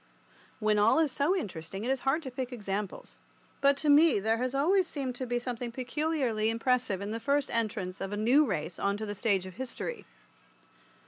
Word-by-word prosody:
When 215 -1 +2
all 210 +7 +5
is 315 -3 +3
so 290 +8 +1
interesting 195 - -5
it 250 - 0
is 270 - 0
hard 270 +6 0
to 260 - -6
pick 255 0 -4
examples, 205 -4 -5 0.4
but 280 0 +4
to 305 - -1
me 295 -3 +6
there 220 +3 +1
has 255 +2 -1
always 360 +6 +3
seemed 270 -5 -3
to 255 - -4
be 245 0 0
something 240 -1 -4
peculiarly 255 -3 -1
impressive 230 -3 0
in 200 +1 -4
the 225 - -3
first 280 +3 0
entrance 210 -5 -2
of 195 0 -3
a 205 - -3
new 245 +8 +5
race 175 - -3
on 200 0 0
to 220 - -4
the 205 - -4
stage 200 -3 0
of 185 +1 -10
history. 260 - -5
245 Hz, 200 wpm, -30 LUFS, 210-280 Hz, 0.4 s, me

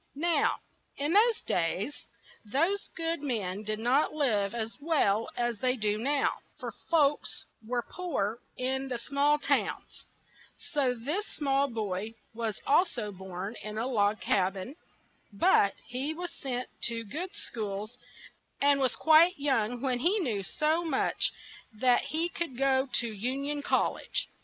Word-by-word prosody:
Now, 335 +3 +2 0.4
in 290 +4 0
those 450 +3 +5
days, 185 - -1 0.4
those 330 - 0
good 330 -1 -1
men 210 -9 -2
did 215 0 -2
not 245 +7 +2
live 220 -8 +1
as 225 -1 -3
well 230 -9 +2
as 240 -3 0
they 255 +2 +2
do 210 -2 +1
now; 280 +4 +1 0.2
for - - -5 0.2
folks 295 -3 +2 0.2
were 240 +2 -1
poor 240 - -2 0.2
in 265 +1 -1
the 250 -2 -2
small 280 +4 +2
towns; - - -1 0.5
so 280 -6 0
this 300 - -2
small 275 -1 +1
boy 215 -2 -3 0.2
was 225 -2 -3
al 345 +6 +5
so 215 -9 -4
born 190 +2 -6
in 215 0 -6
a 225 - 0
log 210 -4 +2
cab 190 -1 +1
in; 195 +9 -7 0.6
but 200 0 +4
he 265 +6 -3
was 350 +1 -5
sent 250 -3 -4 0.2
to 230 -1 -1
good 350 - -5
schools, 215 - -5 0.6
and 285 0 +4
was 260 -2 +2
quite 325 +3 +6
young 245 -5 0
when 255 -2 +1
he 355 - +3
knew 240 - 0
so 310 - 0
much 310 -6 +1 0.4
that 245 +3 +3
he 325 +2 0
could 335 -7 -4
go 265 0 +2
to 235 -2 +1
Un 255 +7 -2
ion 290 0 -2
Col - - +2
lege. - - -3
255 Hz, 150 wpm, -30 LUFS, 215-295 Hz, 0.6 s, quite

